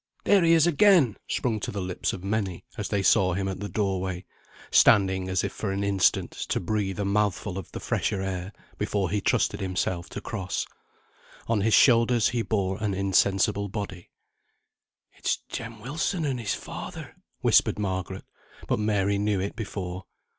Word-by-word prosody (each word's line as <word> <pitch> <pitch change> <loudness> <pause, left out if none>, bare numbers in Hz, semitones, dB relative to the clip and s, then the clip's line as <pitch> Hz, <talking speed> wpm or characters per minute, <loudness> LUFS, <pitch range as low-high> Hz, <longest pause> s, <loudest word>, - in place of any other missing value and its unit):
"There 200 -3 +4
he 165 0 +5
is 165 -1 +5
again!" 175 - +5
sprung 115 -4 -1
to - - -4
the 100 - -4
lips 90 -1 -2
of 90 - -7
many, 100 -3 -2
as 105 -4 -4
they 100 -2 0
saw 95 -3 +4
him 95 +2 -1
at 95 -1 -4
the 100 +1 -5
doorway, 95 -3 -2 0.5
standing 95 -2 +4
as 95 0 0
if 100 - -2
for 105 - -3
an 100 +1 -2
instant 100 -2 +2 0.2
to - - +1
breathe 95 0 -2
a 100 - 0
mouthful 100 -1 0
of 95 -3 -7
the - - -6
fresher 100 - -1
air, 95 0 -4 0.3
before 100 -3 -1
he 105 0 0
trusted - - +1
himself 95 -2 -2
to - - -6
cross. 100 -3 -3 0.8
On 115 -3 +1
his 110 +2 +4
shoulders 115 -2 +5
he 120 -2 -1
bore 100 -2 -1
an 100 -2 0
insensible 100 +1 +2
body. 95 -3 -6 1.0
"It's - - -1
Jem 115 -1 -6
Wilson 155 - -2
and 135 -3 -1
his 110 -4 -1
father," - - -8 0.3
whispered - - +4
Margaret; 95 -4 -3 0.4
but - - 0
Mary 100 -1 +1
knew 105 -1 +1
it 100 +2 -3
before. 95 -4 -5
100 Hz, 170 wpm, -26 LUFS, 95-110 Hz, 1.0 s, he